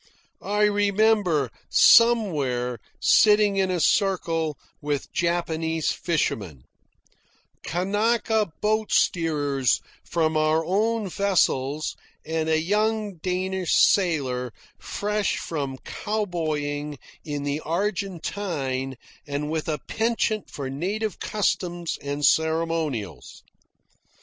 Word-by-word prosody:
I 210 +1 0
remember, 205 - +2 0.2
somewhere, 145 - +4 0.2
sitting 210 -2 +5
in 190 -1 +2
a 180 -1 0
circle 165 -5 +1 0.2
with 145 -1 -3
Japanese 165 -2 0
fishermen, 100 - -2 1.0
Kanaka 210 +3 0
boat 215 0 0
steerers 145 -6 +2 0.2
from 160 -2 0
our 155 +1 +2
own 215 +4 0
vessels, 155 -7 0 0.3
and 160 0 -1
a 160 0 +3
young 210 +2 0
Danish 185 +1 -1
sailor 135 - +2 0.3
fresh 210 -1 -1
from 140 -5 -4
cowboying 155 -8 -3 0.3
in 145 -2 -4
the 145 +1 -1
Argentine 170 -7 -2 0.3
and 145 +1 -3
with 160 0 -2
a 150 - 0
penchant 225 -2 0
for 140 -2 -5
native 195 +10 -3
customs 175 -5 -1
and 145 +1 -2
ceremonials. 160 - 0
165 Hz, 90 wpm, -25 LUFS, 145-205 Hz, 1.0 s, sitting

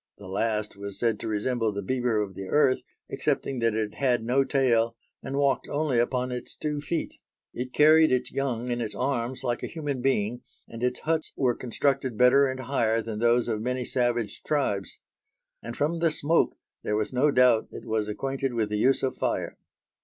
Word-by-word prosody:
The 100 - -11
last 105 +2 -1
was 100 0 -6
said 115 -3 0
to - - -5
resemble 110 +1 0
the 100 0 -4
beaver 120 -1 0
of 100 -2 -7
the 95 +1 -7
earth 140 +1 +3 0.3
excepting 135 -2 -1
that 115 -2 +1
it 110 -1 -2
had 125 -4 +1
no 125 +4 +2
tail 120 -4 +2 0.3
and 135 +2 -4
walked 135 -2 +1
only 145 -4 +1
upon 125 +1 0
its 125 0 -6
two 150 -1 -3
feet. 160 +2 -3 0.3
It 125 +1 -5
carried 155 +2 +6
its 125 -1 0
young 125 -3 -2
in 120 0 -1
its 110 -2 -4
arms 125 -1 -2
like 120 0 -1
a - - -3
human 145 -6 -4
being, 120 -2 0 0.3
and 115 - -9
its 125 0 -1
huts 160 0 -1
were 125 -3 +2
constructed 130 0 -1
better 125 +3 +6
and 130 0 -4
higher 115 -4 0
than 110 -2 -5
those 120 +1 +3
of 110 -2 -1
many 125 +1 -2
savage 120 -4 -1
tribes; 105 -10 -1 0.6
and, 120 0 -7
from 160 +4 0
the 165 0 +3
smoke, 155 +2 +1 0.2
there 105 - -1
was 105 +3 -1
no 135 +4 +3
doubt 125 -4 +4
it - - -10
was 110 -1 -1
acquainted 135 +4 -3
with 110 -2 0
the 105 - -1
use 130 +4 +3
of 130 - -1
fire. - - -1
125 Hz, 195 wpm, -27 LUFS, 115-135 Hz, 0.6 s, carried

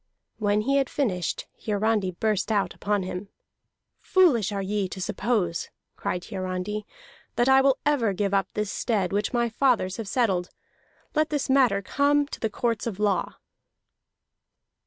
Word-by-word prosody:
When 205 -1 +2
he 275 +5 +2
had 270 -2 +1
finished, 185 - -1 0.2
Hiarandi 210 -2 +1
burst 205 +3 -1
out 205 -2 +1
upon 205 -1 -1
him. 185 +2 -5 0.7
"Foolish 280 - +3
are 200 -1 -2
ye 200 -1 -1
to 190 - -7
suppose," 185 -3 -1 0.3
cried 180 - -3
Hiarandi, 185 +3 -4 0.5
"that 240 - +2
I 265 0 +6
will 270 0 +3
ever 275 -8 +2
give 200 +1 -1
up 195 0 +2
this 210 -2 -1
stead 200 -6 -1
which 205 0 0
my 240 -1 +1
fathers 225 -5 +1
have 225 -3 -5
settled. 195 -6 +1 0.6
Let 310 0 +2
this 290 -3 -1
matter 245 -8 +4
come 285 +6 +2
to - - -7
the 225 - -1
courts 230 +2 -1
of 210 -5 -4
law." 205 -4 0
210 Hz, 155 wpm, -26 LUFS, 195-245 Hz, 0.7 s, I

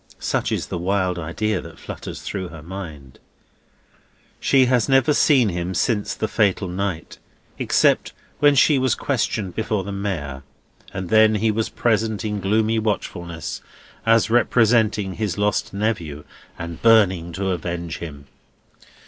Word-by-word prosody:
Such - - -1
is - - -1
the 85 - -5
wild 90 -1 0
idea 95 +5 -2
that 80 0 -12
flutters - - -8
through 95 -3 -4
her 80 -3 -11
mind. 80 -7 -9 1.2
She 135 -2 +4
has 125 -2 +2
never 135 +2 +4
seen 135 -7 +4
him 90 +1 -3
since 105 +1 0
the 110 - -2
fatal 100 -3 +1
night, 90 -2 -4 0.4
except - - +2 0.3
when 145 -1 +5
she 140 +1 +5
was 130 -2 +2
questioned 110 -8 -1
before 110 -1 -1
the 100 - -6
Mayor, 90 -10 -4 0.5
and 95 -2 -5
then 110 0 +5
he 110 +1 +2
was 110 +1 -1
present 110 -3 0
in 105 -1 -2
gloomy 110 +3 +1
watchfulness, 85 -6 -4 0.4
as 115 0 +3
representing 110 -4 +3
his 105 -5 -3
lost 105 0 0
nephew 95 -8 -2 0.3
and 85 0 -7
burning 95 -7 +4
to 95 +2 -1
avenge 85 -1 -4
him. 70 -4 -8
100 Hz, 140 wpm, -22 LUFS, 85-110 Hz, 1.2 s, when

